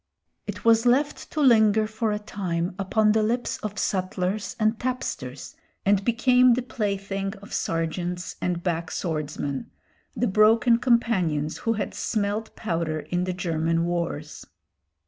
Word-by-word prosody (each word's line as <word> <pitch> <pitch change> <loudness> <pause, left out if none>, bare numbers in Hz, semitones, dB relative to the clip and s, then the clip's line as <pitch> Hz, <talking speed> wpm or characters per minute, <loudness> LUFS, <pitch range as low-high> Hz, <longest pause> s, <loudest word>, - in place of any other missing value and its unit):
It - - -6
was 230 +1 +5
left 280 +4 +1
to 310 - -2
linger 220 -5 +5
for 220 0 -2
a 210 - 0
time 180 -5 -3
upon 210 +2 +2
the 220 +1 +3
lips 235 +3 -1
of 210 -1 -5
sutlers 185 +1 -1
and 220 +1 +2
tapsters, 145 - -4 0.3
and 200 0 +3
became 250 +2 +4
the 250 - -2
plaything 195 -3 -3
of 200 0 -12
sergeants 175 +2 -2
and 175 -1 -1
backswordsmen, 160 -5 -3 0.5
the - - +1
broken 225 +3 +4
companions 190 - +1
who - - +4
had 210 -2 -3
smelt 215 0 -2
powder 165 -6 -2
in 180 0 -2
the 185 - -2
German 165 -1 0
wars. 170 -3 -3
200 Hz, 135 wpm, -25 LUFS, 170-225 Hz, 0.5 s, was